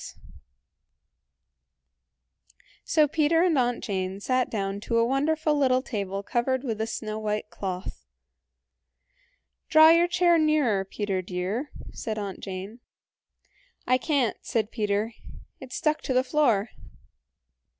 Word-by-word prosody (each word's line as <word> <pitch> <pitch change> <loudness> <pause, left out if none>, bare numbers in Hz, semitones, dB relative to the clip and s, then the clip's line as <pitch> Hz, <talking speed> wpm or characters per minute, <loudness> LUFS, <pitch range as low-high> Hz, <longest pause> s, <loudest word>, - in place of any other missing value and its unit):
So 310 -2 +3
Peter 315 +3 +2
and 355 -3 +3
Aunt 245 -1 0
Jane 190 -1 -3
sat 255 +4 0
down 195 -2 -3
to 230 +3 -1
a 230 - +4
wonderful 305 +4 +1
little 260 -3 +2
table 200 -5 -4
covered 255 +4 -1
with 225 -5 -3
a 220 - -1
snow 215 -1 -4
white 210 0 -3
cloth. 185 - -6 1.6
"Draw 315 0 +8
your 335 +1 +5
chair 350 -1 +3
nearer, 295 -11 +2
Peter 195 -1 -2
dear," 185 - -3 0.2
said 220 -1 -5
Aunt 200 -2 -5
Jane. 195 +4 -7 1.1
"I 255 0 +3
can't" 275 -6 0
said 220 -3 -2
Peter, 210 0 -1 0.5
"it's 260 -1 -8
stuck 305 0 0
to 260 - -2
the 255 - +4
floor." 245 -7 +2
235 Hz, 120 wpm, -26 LUFS, 205-290 Hz, 1.6 s, Draw